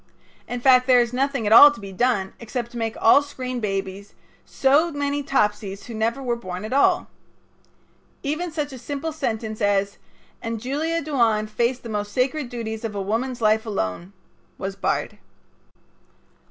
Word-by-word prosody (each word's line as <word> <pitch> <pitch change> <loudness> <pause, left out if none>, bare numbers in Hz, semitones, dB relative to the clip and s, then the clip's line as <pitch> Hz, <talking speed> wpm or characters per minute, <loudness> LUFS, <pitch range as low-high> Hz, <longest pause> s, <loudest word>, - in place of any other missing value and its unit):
In 245 - -4
fact, 255 0 +5
there 250 -1 +6
is 240 0 0
nothing 270 -2 0
at 210 - +3
all 290 +5 +11
to 290 - -7
be 195 -1 -8
done 195 -2 0
except 235 +1 -5
to 240 - -8
make 225 -1 -3
all 255 +5 +6
screen 255 -3 -5
babies 195 -1 -4 0.3
so 290 +5 +3
many 285 0 -2
Topsies 210 -7 -1
who 235 - -8
never 230 +5 -1
were 240 -2 0
born 185 -3 -6
at 220 - -5
all. 280 - +3 1.2
Even 310 +5 -2
such 295 -3 -3
a 260 - -8
simple 285 +6 -4
sentence 220 -7 -4
as 200 -1 +1 0.4
"And 230 -1 -4
Julia 305 +7 -2
Duane 235 -8 +1
faced 235 +4 -1
the - - -7
most 205 -1 -3
sacred 260 +1 0
duties 225 -2 -5
of 220 -2 -4
a - - -2
woman's 230 +6 -2
life 215 0 +3
alone" 180 - -4 0.4
was 195 0 -5
barred. 195 - -2
235 Hz, 165 wpm, -23 LUFS, 210-270 Hz, 1.2 s, all